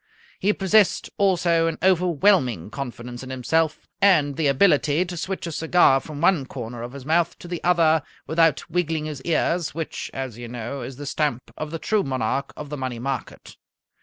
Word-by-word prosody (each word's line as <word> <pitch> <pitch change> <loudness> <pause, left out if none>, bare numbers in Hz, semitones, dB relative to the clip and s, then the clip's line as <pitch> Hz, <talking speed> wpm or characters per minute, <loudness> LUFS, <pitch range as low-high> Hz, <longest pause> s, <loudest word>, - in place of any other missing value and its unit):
He 205 - +3
possessed 205 0 +2
also 175 -4 +3
an 165 - -2
overwhelming 175 - +2
confidence 120 -3 -6
in 130 - -8
himself, 155 +5 0
and 155 -8 +4
the 155 0 +1
ability 150 +2 +3
to 175 0 -6
switch 185 +3 -4
a 170 - -4
cigar 160 -3 +4
from 150 +1 -8
one 170 -6 +3
corner 120 -2 -7
of 120 +2 -7
his 140 -2 -9
mouth 165 +2 +1
to - - -11
the 175 -1 -5
other 165 -3 +4 0.2
without 160 -2 +2
wiggling 165 -2 -1
his 150 -3 -6
ears, 170 +1 0
which, 165 -1 -4
as 130 -4 -6
you 120 - -6
know, 120 +3 -5
is 125 +2 -7
the 145 +2 -8
stamp 145 -3 -2
of 155 - -5
the 165 - -4
true 215 +5 +1
Monarch 135 - -2
of 150 -1 -7
the 150 - -3
Money 130 -3 -4
Market. 130 +1 -5
155 Hz, 185 wpm, -23 LUFS, 130-170 Hz, 0.2 s, and